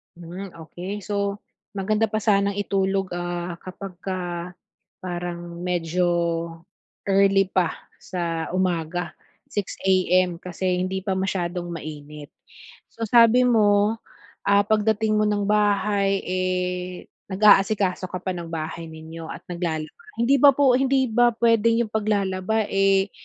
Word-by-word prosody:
Hmm, 175 +3 -8 0.2
okey 190 +3 -6
so, 200 -1 -1 0.4
maganda 215 +3 +1
pa 215 0 -2
sanang 200 -1 +2
itulog, 195 -1 -1
ah, 175 0 -4
kapagka 180 -2 -6 0.5
parang 175 -1 -5
medyo 180 0 0 1.0
early 195 -1 +3
pa 180 -3 +1 0.2
sa 170 -3 -3
umaga, 175 -1 -1 0.4
6:00 205 -2 -3
AM 185 -2 +2
kasi 180 0 -2
hindi 190 +1 -2
pa 195 -2 -1
masyadong 180 -2 -2
mainit. 150 -2 -8 0.6
So 230 - -7
sabi 235 +2 +6
mo, 215 -2 +3 0.5
ah, 200 0 +5
pagdating 215 0 +1
mo 215 - +3
ng 205 -1 0
bahay, 205 -1 +1
eh, 180 0 -2 0.2
nag-aasikaso 195 -1 +3
ka 180 +1 -5
pa 185 - -1
ng 170 -2 -6
bahay 165 0 -5
ninyo 160 +1 -9
at - - -8
naglalaba. 160 -3 -3 0.3
Hndi 240 +4 +3
ba 285 - +9
po 275 -3 +4
hindi 265 +1 +2
ba 240 +1 +5
puwedeng 230 0 +3
'yong 215 - -15
paglalaba, 205 0 0
eh, 195 0 +2
190 Hz, 125 wpm, -23 LUFS, 175-210 Hz, 1.0 s, ba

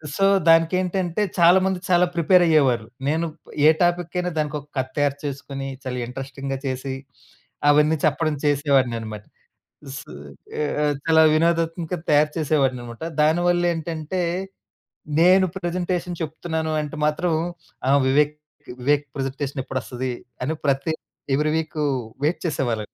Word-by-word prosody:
So, 195 - +2 0.2
దానికేంటంటే, 180 +3 +2 0.2
చాలా 175 +2 +7
మంది 190 -1 0
చాలా 180 0 +5
ప్రిపేరయ్యేవారు. 155 - +4 0.2
నేను 160 +3 +1 0.2
ప్ - - -15 0.2
ఏ - - +9
టాపిక్కైనా 175 +1 0
దానికొక 150 -1 -3
కథ 130 0 0
తయారు 145 -1 +1
చేసుకొనీ, 135 -1 -5 0.2
చాలా 125 -1 -3
ఇంట్రస్టింగ్‌గా 135 +1 -5
చేసి, 130 +1 -3 0.8
అవన్నీ 150 +2 +4
చెప్పడం 155 +1 +1
చేసేవాడిననమాట. 130 -7 +1 0.6
ఉ - - -7
సూ - - -12 0.5
ఏ - - +1 0.4
చాలా 160 -1 +5
వినోదాత్మక 165 +1 +1 0.2
తయారు 150 +1 +4
చేసేవాడిననమాట. 130 -6 -1 0.2
దాని 160 +3 +3
వల్లేంటంటే, 170 -1 -1 1.0
నేను 185 +2 +6
ప్రెజెంటేషన్ 175 -1 -2
చెప్తున్నాను 160 0 -3
అంటే 150 +1 -6
మాత్రం, 160 +3 0 0.6
ఆ! - - +5 0.2
వివేక్ 150 +3 +3 0.5
వివేక్ 145 +3 +2
ప్రజెంటేషనెప్పుడొస్తది 135 -2 -3 0.3
అని 145 +5 -1
ప్రతి, 140 +2 +1 0.4
ఎవ్రీ 150 +2 +1
వీకూ 155 -1 -2 0.4
వెయిట్ 155 +4 +1
చేసేవాళ్ళండి. 120 -8 -2
150 Hz, 115 wpm, -23 LUFS, 135-170 Hz, 1.0 s, ఏ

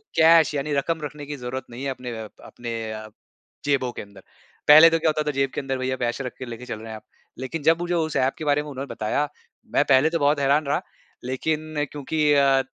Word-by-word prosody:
Cash 160 -1 +6
यानी 145 +1 -2
रकम 160 +3 -1
रखने 145 0 -6
की 145 +1 -5
ज़रूरत 125 +1 -5
नहीं 120 +3 -8
है 140 - -1
अपने 125 -2 -5
अ, 110 - -6 0.2
अपने 115 -2 -5
अ, 110 0 -7 0.6
जेबों 135 -3 +1
के - - -7
अंदर। 100 -1 -13 0.5
पहले 155 +3 +10
तो 165 0 +1
क्या 160 - +2
होता 155 0 0
था - - +1
जेब 135 0 +1
के - - -1
अंदर 135 -1 -3
भैया 130 0 -1
पैसे 120 +2 -2
रख 125 - -5
के 130 - -5
लेके 120 0 -8
चल 110 - -6
रहे 110 +1 -9
हैं 110 - -6
आप। - - -16 0.4
लेकिन 140 +4 -5
जब 165 +2 +4
मुझे 175 0 -2
उस 160 -3 -1
ऐप 130 +1 +2
के 155 - -6
बारे 145 0 +2
में 150 - -8
उन्होंने 135 0 -6
बताया, 125 +7 -1 0.5
मैं - - +4
पहले 140 +2 +5
तो 165 0 -1
बहुत 145 0 +2
हैरान 140 +2 +2
रहा 140 - 0 0.4
लेकिन 150 +4 -2
क्योंकि 150 +1 +1
अ, 135 -2 +4
140 Hz, 240 wpm, -24 LUFS, 130-150 Hz, 0.6 s, पहले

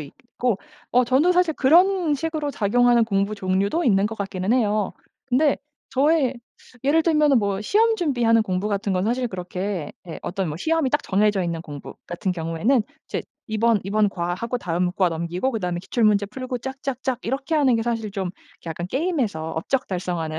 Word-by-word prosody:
있고. 240 - -3 0.3
어 250 +1 +4
저는 265 +8 +3
사실 355 -3 +2
그런 345 +2 +4
식으로 310 -1 -2
작용하는 240 +1 +3
공부 200 0 0
종류도 200 - 0
있는 200 -3 +3
것 220 +1 -5
같기는 195 0 -1
해요. 215 -5 +1 0.3
근데 270 +3 +3 0.3
저의 275 -1 +2 0.5
예를 315 +4 +4
들면은 300 -5 +4
뭐 200 -2 -1
시험 445 - +3
준비하는 240 - +2
공부같은 200 +1 -1
건 185 +1 0
사실 245 +2 0
그렇게 180 -2 -4 0.2
예 165 - -6
어떤 190 -2 -2
뭐 150 - -4
시험이 320 - +1
딱 295 - +1
정해져 205 0 +2
있는 170 -1 -2
공부 145 -4 -9
같은 180 +2 -2
경우에는 170 +9 +1 0.2
이제 - - -3 0.2
이번 220 0 +2
이번 210 +1 +2
과 175 -2 -2
하고 235 +6 -3
다음 180 -3 -1
과 190 -2 +2
넘기고 170 +8 -2
그 225 - -2
다음에 175 -1 -2
기출문제 210 0 +2
풀고 255 +3 -5
쫙쫙쫙 265 0 -3
이렇게 270 +6 -2
하는 275 -5 +4
게 225 - 0
사실 225 -3 -2
좀 190 -3 -3 0.3
약간 170 +1 -4
게임에서 245 - -1
업적 250 +11 -1
달성하는 175 -4 -3
220 Hz, 370 characters per minute, -23 LUFS, 185-265 Hz, 0.5 s, 어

